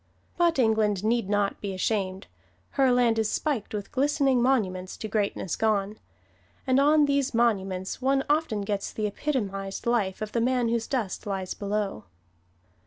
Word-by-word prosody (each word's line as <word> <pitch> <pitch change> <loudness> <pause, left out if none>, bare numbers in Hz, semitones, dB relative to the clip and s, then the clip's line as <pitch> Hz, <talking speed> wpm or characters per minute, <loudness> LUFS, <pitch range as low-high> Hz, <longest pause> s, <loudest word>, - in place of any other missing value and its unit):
But 340 -2 +2
England 215 -5 +2
need 225 -2 +1
not 205 -1 0
be 195 -2 -4
ashamed. 190 -1 -1 0.5
Her 270 -2 +3
land 240 -2 +3
is 220 -1 +1
spiked 280 -9 -2
with 205 -2 -5
glistening 275 -2 +2
monuments 190 -8 0
to 220 - -5
greatness 200 -4 -1
gone. 210 -1 0 0.7
And 260 +1 +3
on 295 +1 +5
these 280 -3 0
monuments 195 -4 0
one 270 +1 +2
often 295 -8 +1
gets 200 0 -3
the 215 - -3
epitomized 200 -5 -3
life 215 -5 0
of 215 - -6
the 235 - 0
man 245 -1 +1
whose 230 -1 -1
dust 220 -7 -3
lies 190 -2 -3
below. 200 - -3
220 Hz, 155 wpm, -27 LUFS, 200-255 Hz, 0.7 s, on